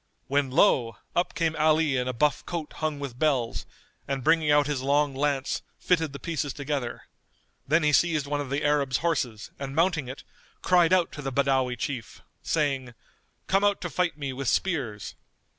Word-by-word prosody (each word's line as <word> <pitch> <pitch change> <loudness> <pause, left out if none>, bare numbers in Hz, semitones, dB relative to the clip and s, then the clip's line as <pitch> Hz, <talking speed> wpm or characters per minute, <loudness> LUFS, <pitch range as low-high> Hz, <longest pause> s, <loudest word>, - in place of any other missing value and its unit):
when, 140 0 +1
lo! 130 - +3 0.2
up 175 - 0
came 165 -2 0
Ali 155 -2 +3
in 125 -1 0
a - - 0
buff 145 +5 +1
coat 165 -3 -4
hung 155 -2 -2
with 130 -3 -6
bells, 135 -7 0 0.4
and 135 -2 -2
bringing 160 0 +3
out 145 0 +5
his 145 -3 -2
long 140 +1 +2
lance, 140 0 -1 0.2
fitted 165 -4 +1
the 140 - -7
pieces 145 -4 -3
together. 140 -4 -4 0.6
Then 160 +3 +3
he 150 0 +3
seized 155 -2 +3
one 145 0 -2
of 140 - -6
the 140 +2 -1
Arab's 145 -3 +2
horses 125 -10 -1
and 140 0 -5
mounting 165 -4 +1
it 130 +2 -8 0.4
cried 175 -2 +4
out 185 -2 +3
to 150 - -7
the 135 -1 -3
Badawi 130 -2 +1
Chief, 125 -6 -5 0.2
saying, 135 -6 -1 0.5
"Come 195 +1 +2
out 205 -1 +3
to 175 - -4
fight 180 -4 0
me 140 -3 -4
with 135 0 -4
spears!" 125 - -1
145 Hz, 180 wpm, -27 LUFS, 135-160 Hz, 0.6 s, out